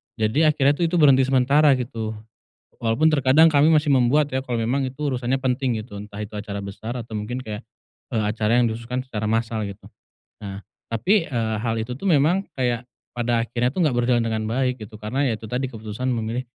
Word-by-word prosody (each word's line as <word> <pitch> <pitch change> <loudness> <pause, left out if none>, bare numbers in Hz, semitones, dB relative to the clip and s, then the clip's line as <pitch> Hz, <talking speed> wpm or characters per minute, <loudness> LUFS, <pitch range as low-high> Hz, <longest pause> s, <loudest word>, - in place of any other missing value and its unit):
jadi 145 +8 +2
akhirnya 140 -1 +4
tuh 165 +3 0
itu 180 - -2
berhenti 135 -5 +5
sementara 135 +2 +4
gitu, 115 -4 -4 0.7
walaupun 120 +8 +2
terkadang 140 +2 +5
kami 150 +1 +4
masih 150 -3 +3
membuat 135 +3 +3
ya 130 - 0
kalau 125 -3 -3
memang 120 +5 0
itu 130 +2 -9
urusannya 130 -1 0
penting 130 -2 0
gitu, 105 -2 -10
entah 105 0 -11
itu 105 +1 -7
acara 105 -1 -5
besar 110 +5 -6
atau 115 -1 -8
mungkin 115 +4 -4
kayak, 105 +1 -6 0.5
eee, 110 -2 +1
acara 110 +2 +1
yang 125 - +4
dikhususkan 115 +3 -4
secara 110 -4 -4
masal 115 -1 -1
gitu, 100 - -10 0.6
nah 100 -1 -6 0.3
tapi, 165 - +2
eee, 115 -3 -1
hal 115 -1 -1
itu 125 +2 -5
tuh 200 - -8
memang 170 +5 +3
kayak 120 -2 -1 0.3
pada 120 -1 0
akhirnya 120 +1 0
tuh 180 -3 +1
gak 140 - +2
berjalan 120 -1 +2
dengan 110 -1 -1
baik 125 -1 -1
gitu 110 0 -9
karena 110 +6 -3
ya 115 -3 -1
itu 110 - -10
tadi 125 +4 -2
keputusan 110 +2 -5
memilih 120 +1 -2
120 Hz, 200 wpm, -23 LUFS, 110-135 Hz, 0.7 s, berhenti